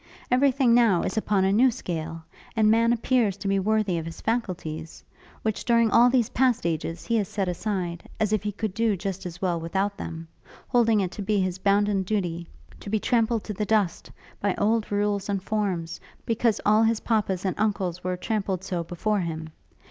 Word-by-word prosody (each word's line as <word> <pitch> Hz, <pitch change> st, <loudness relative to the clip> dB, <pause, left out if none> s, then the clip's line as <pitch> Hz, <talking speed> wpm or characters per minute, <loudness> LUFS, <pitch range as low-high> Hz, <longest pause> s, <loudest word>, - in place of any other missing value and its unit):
Every 265 Hz, +3 st, +5 dB
thing 255 Hz, -2 st, +3 dB
now 230 Hz, -7 st, +4 dB
is -, -, -2 dB
upon 210 Hz, -3 st, +1 dB
a 195 Hz, -, +2 dB
new 250 Hz, +5 st, +5 dB
scale, 165 Hz, -8 st, -5 dB, 0.3 s
and 215 Hz, -1 st, +4 dB
man 230 Hz, +1 st, +4 dB
appears 235 Hz, -4 st, +1 dB
to 200 Hz, 0 st, -5 dB
be 195 Hz, 0 st, +2 dB
worthy 210 Hz, -3 st, +1 dB
of 160 Hz, -, -6 dB
his 165 Hz, -, -8 dB
faculties; 170 Hz, -8 st, -3 dB, 0.4 s
which, 220 Hz, -2 st, -1 dB
during 230 Hz, -2 st, +3 dB
all 240 Hz, +2 st, +6 dB
these 245 Hz, -3 st, +2 dB
past 250 Hz, -6 st, +2 dB
ages, 165 Hz, 0 st, -2 dB
he 230 Hz, -, +1 dB
has 205 Hz, -3 st, 0 dB
set 195 Hz, -1 st, -2 dB
aside, 180 Hz, -2 st, -3 dB
as 215 Hz, -1 st, +1 dB
if 215 Hz, -, +2 dB
he 210 Hz, 0 st, -2 dB
could 210 Hz, 0 st, -4 dB
do 225 Hz, -2 st, +1 dB
just 190 Hz, 0 st, -4 dB
as 175 Hz, +2 st, -9 dB
well 175 Hz, -2 st, +1 dB
without 195 Hz, +5 st, -2 dB
them; 165 Hz, -4 st, -6 dB, 0.4 s
holding 225 Hz, -3 st, +3 dB
it 185 Hz, -2 st, -2 dB
to 205 Hz, -, -7 dB
be 205 Hz, +1 st, +1 dB
his 185 Hz, -1 st, -1 dB
bounden 200 Hz, 0 st, +2 dB
duty, 180 Hz, -4 st, -2 dB, 0.3 s
to -, -, -8 dB
be 215 Hz, +1 st, +1 dB
trampled 230 Hz, -1 st, +1 dB
to 210 Hz, -, -5 dB
the 210 Hz, -, -2 dB
dust, 205 Hz, -4 st, 0 dB, 0.3 s
by 200 Hz, -2 st, 0 dB
old 220 Hz, 0 st, +1 dB
rules 205 Hz, -1 st, 0 dB
and 195 Hz, -2 st, -1 dB
forms, 190 Hz, -6 st, -2 dB, 0.3 s
because 230 Hz, -1 st, +1 dB
all 215 Hz, +1 st, +5 dB
his 225 Hz, -1 st, +2 dB
papas 200 Hz, -5 st, 0 dB
and 185 Hz, -, +1 dB
uncles 190 Hz, -5 st, -1 dB
were 180 Hz, 0 st, -2 dB
trampled 195 Hz, -2 st, -2 dB
so 180 Hz, -3 st, -2 dB
before 200 Hz, +5 st, -1 dB
him. 160 Hz, -3 st, -4 dB
205 Hz, 200 wpm, -25 LUFS, 180-220 Hz, 0.4 s, all